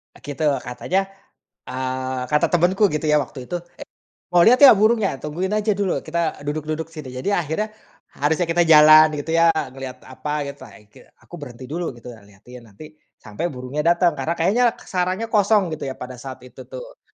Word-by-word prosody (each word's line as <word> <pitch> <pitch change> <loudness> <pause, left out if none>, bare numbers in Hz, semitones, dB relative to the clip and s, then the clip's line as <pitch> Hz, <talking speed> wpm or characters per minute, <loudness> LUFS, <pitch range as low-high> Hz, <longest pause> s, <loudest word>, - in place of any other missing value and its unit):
Eee, - - -19
gitu 145 +2 -2 0.2
katanya, 125 +10 -2 0.7
eee, 130 0 -4
kata 150 - +3
temanku 180 +4 +2
gitu 150 +1 -2
ya 150 - +3
waktu 130 -1 -11
itu, - - -4 0.2
"Eh, - - -8 0.4
mau 175 -1 +4
lihat 250 +4 +5
nggak 265 -7 +9
burungnya? 215 -1 +3
Tungguin 155 +7 -4
aja 215 0 +1
dulu. 195 -2 -2
Kita 165 0 -2
duduk-duduk 155 +2 -3
sini." 150 -5 -8
Jadi 130 +11 -3
akhirnya, 175 +3 -1 0.5
harusnya 160 +5 0
kita 165 +1 +1
jalan 155 0 +8
gitu 150 +3 -5
ya, 165 0 +5 0.2
ngelihat 135 -1 -9
apa 150 +3 -4
gitu 140 0 -9
ake 105 0 -18 0.2
aku - - -25
berhenti 125 -3 -10
dulu 160 0 -5
gitu, 120 +1 -11
liatin 105 +4 -15
nanti 150 +10 -13 0.3
sampai 105 +10 -5
burungnya 130 +2 -5
datang. 175 0 +3
Karena 155 +5 -1
kayaknya 205 +9 +2 0.2
sarangnya 185 +4 -2
kosong 205 -4 +2
gitu 145 -3 -5
ya 130 - -5
pada 125 -1 -9
saat 130 0 -9
itu 125 - -13
tuh. - - -10
155 Hz, 180 wpm, -21 LUFS, 130-180 Hz, 0.7 s, nggak